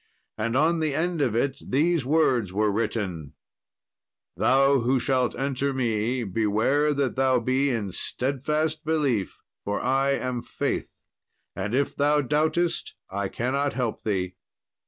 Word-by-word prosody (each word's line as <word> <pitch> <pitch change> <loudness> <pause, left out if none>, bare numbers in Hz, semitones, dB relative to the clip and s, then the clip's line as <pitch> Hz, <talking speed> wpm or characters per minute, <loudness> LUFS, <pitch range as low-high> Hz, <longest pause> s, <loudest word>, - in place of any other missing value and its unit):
And 115 +3 -1
on 165 +3 +3
the 155 -3 0
end 170 0 0
of 125 -6 +1
it 135 +3 0
these 160 +3 +1
words 130 - +2
were 105 +2 +1
written, 100 -8 -3 1.0
"Thou 135 +1 +4
who 125 +2 +2
shalt 130 -1 +1
enter 135 +1 -1
me, 120 0 0
beware 110 +9 +1
that 140 -3 0
thou 130 -1 +3
be 130 +4 +1
in 110 -6 -2
steadfast 150 - -1
belief, 145 -10 0 0.3
for 100 0 -2
I 135 +2 +2
am 125 -2 -2
Faith; - - -4 0.5
and 105 +4 -2
if 140 +2 0
thou 150 +1 +3
doubtest, 155 +5 0 0.2
I 100 0 -2
cannot 135 +7 -1
help 120 -4 -2
thee." 95 -4 -1
130 Hz, 135 wpm, -25 LUFS, 115-145 Hz, 1.0 s, Thou